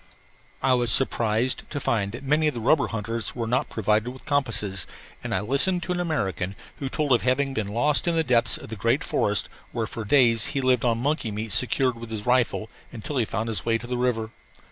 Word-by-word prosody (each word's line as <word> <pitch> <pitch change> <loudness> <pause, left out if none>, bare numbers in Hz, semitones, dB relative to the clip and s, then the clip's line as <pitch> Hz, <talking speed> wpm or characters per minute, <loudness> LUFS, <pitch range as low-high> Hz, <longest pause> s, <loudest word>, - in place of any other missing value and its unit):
I 135 - +4
was 120 -2 +2
surprised 120 -1 +1
to 145 - -4
find 100 -6 0
that 120 +5 -8
many 150 +3 +2
of 150 - -1
the - - -3
rubber 130 +4 +3
hunters 115 0 -4
were 120 -2 -2
not 125 +5 0
provided 110 +1 0
with 130 +1 -11
compasses, 115 -9 0 0.4
and - - -5
I - - 0
listened 145 - +3
to 180 - -4
an 180 - -1
American 100 - -2 0.2
who 135 - -4
told 150 0 -2
of 125 - +4
having 135 +2 +1
been 110 -6 -2
lost 140 +11 +2
in 170 - +2
the 165 - +2
depths 120 -4 +2
of - - -11
the 110 - -5
great 115 +6 +1
forest 105 -1 +1 0.2
where 115 -2 -2
for 110 +1 -6
days 115 -1 +4
he - - +3
lived 130 -2 +2
on 115 -2 +2
monkey 140 0 -1
meat 105 0 -5
secured 125 +1 +2
with 115 -1 -8
his 110 -2 -5
rifle 125 -3 +1 0.2
until 130 +4 -5
he 120 - +2
found 110 +2 -3
his 110 -2 -3
way 115 -1 +1
to 115 - -10
the 125 +1 -3
river. 120 -3 -1
120 Hz, 225 wpm, -25 LUFS, 110-135 Hz, 0.4 s, I